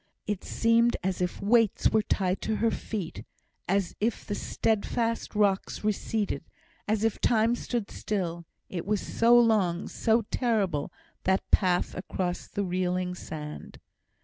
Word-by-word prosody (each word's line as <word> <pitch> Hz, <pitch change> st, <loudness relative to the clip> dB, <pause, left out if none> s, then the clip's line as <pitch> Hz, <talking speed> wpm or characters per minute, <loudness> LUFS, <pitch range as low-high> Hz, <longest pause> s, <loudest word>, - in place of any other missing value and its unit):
It 210 Hz, -3 st, -3 dB
seemed 230 Hz, +1 st, +3 dB
as 185 Hz, -1 st, -1 dB
if 180 Hz, +1 st, -2 dB
weights 225 Hz, 0 st, +3 dB
were 220 Hz, -, +4 dB
tied 190 Hz, -2 st, 0 dB
to 220 Hz, -, -1 dB
her 225 Hz, +1 st, +2 dB
feet 200 Hz, -8 st, -5 dB, 0.4 s
as 195 Hz, -1 st, 0 dB
if 220 Hz, +1 st, -1 dB
the -, -, -3 dB
steadfast 225 Hz, +2 st, -1 dB
rocks 200 Hz, -1 st, +1 dB
receded 215 Hz, 0 st, -1 dB, 0.4 s
as 215 Hz, 0 st, +1 dB
if 225 Hz, -2 st, 0 dB
time 225 Hz, 0 st, +3 dB
stood 235 Hz, -3 st, -3 dB
still; 175 Hz, -5 st, -3 dB, 0.2 s
it 180 Hz, 0 st, -5 dB
was 210 Hz, -1 st, +1 dB
so 235 Hz, +5 st, +4 dB
long, 200 Hz, -7 st, +2 dB
so 225 Hz, 0 st, +2 dB
terrible, 200 Hz, -, 0 dB, 0.3 s
that 190 Hz, +1 st, +2 dB
path 180 Hz, -3 st, +3 dB
across 180 Hz, -1 st, -3 dB
the 205 Hz, -, -2 dB
reeling 180 Hz, 0 st, -1 dB
sand. 150 Hz, -4 st, -8 dB
205 Hz, 140 wpm, -28 LUFS, 180-225 Hz, 0.4 s, were